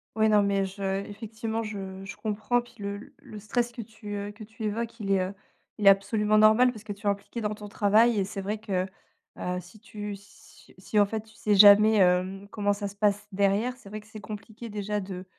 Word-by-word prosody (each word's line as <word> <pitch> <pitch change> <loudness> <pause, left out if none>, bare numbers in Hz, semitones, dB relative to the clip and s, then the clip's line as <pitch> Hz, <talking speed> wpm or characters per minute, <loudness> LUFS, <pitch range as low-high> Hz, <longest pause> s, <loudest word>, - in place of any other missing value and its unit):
Ouais, 220 0 +3
non, 210 -1 +5
mais 200 -1 +1
je 195 0 -3
effectivement, 225 +2 -5
je 195 -3 -6
je 195 0 -8
comprends. 220 +3 0
Puis 240 - -18
le 200 +1 -6
le 215 - -10
stress 240 +3 -1
que 235 - -7
tu, 215 -1 -9
heu, 200 +1 -4
que 215 +1 -11
tu 220 +1 -10
évoques, 230 +2 -3
il 200 -2 -4
est, 190 -1 +3
heu, 185 +2 -3 0.4
il 205 -2 +1
est - - +13
absolument 210 +2 +3
normal 220 +4 +6
parce 215 -1 -11
que 215 - -7
tu 205 +1 -6
es - - +5
impliqué 200 +4 -3
dans 210 -1 -2
ton 210 -1 -9
travail, 215 +3 +4
et 195 - +1
c'est 195 0 -5
vrai 205 +3 -2
que, 195 -4 -2 0.5
heu, 180 0 -2
si 180 +5 -16
tu 210 -2 -7
si 200 +1 -19
si 205 +3 0
en 205 - +6
fait 220 +1 -3
tu 220 0 -21
sais 210 -1 +1
jamais, 210 +2 +8
hem, 185 +2 +2
comment 205 -1 +1
ça 200 0 -4
se 200 - -13
passe 205 0 +1
derrière. 200 +6 +1
C'est 205 - -16
vrai 210 +1 -7
que 210 - -21
c'est 220 -1 -10
compliqué 215 +2 -8
déjà 210 0 -3
de, 185 -1 -7
210 Hz, 235 wpm, -27 LUFS, 200-220 Hz, 0.5 s, est